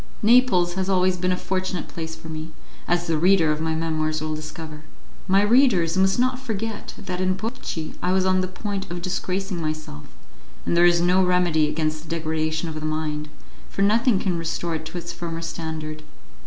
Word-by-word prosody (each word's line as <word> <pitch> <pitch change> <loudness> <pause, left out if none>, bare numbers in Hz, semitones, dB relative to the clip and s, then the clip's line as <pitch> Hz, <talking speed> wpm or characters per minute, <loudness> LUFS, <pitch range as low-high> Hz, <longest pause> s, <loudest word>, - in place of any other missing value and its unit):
Naples 215 -7 +5
has 190 +1 -1
always 185 -1 +3
been 180 0 0
a 180 - +1
fortunate 185 -2 -2
place 160 -1 -6
for - - -12
me, 160 0 -6 0.4
as 175 0 +1
the 165 -2 0
reader 175 -2 +4
of 150 0 -1
my 160 0 0
memoirs 155 -1 -1
will 155 0 -2
discover. 155 0 -7 0.5
My 195 +2 +4
readers 205 -8 +4
must 190 0 +3
not 255 +1 +1
forget 225 -4 -4
that 185 -2 -4
in 185 0 +2
Portici 190 -6 -5
I 180 - +1
was 190 0 +2
on 185 0 +3
the 185 - -1
point 195 +1 -4
of 175 0 -5
disgracing 185 0 -2
myself, 155 - -5 0.6
and - - +1
there 175 +1 +7
is 175 -1 +4
no 180 +2 +4
remedy 175 -4 +3
against 155 -1 -1
the - - -13
degradation 160 0 -1
of 160 - -4
the 155 - -5
mind, 155 -1 -2 0.4
for 195 - 0
nothing 225 +2 +4
can 180 -3 -1
restore 165 +1 -2
it 160 0 -4
to 180 - -6
its 175 0 -5
former 165 -1 -5
standard. 160 -2 -5
175 Hz, 195 wpm, -24 LUFS, 160-190 Hz, 0.6 s, there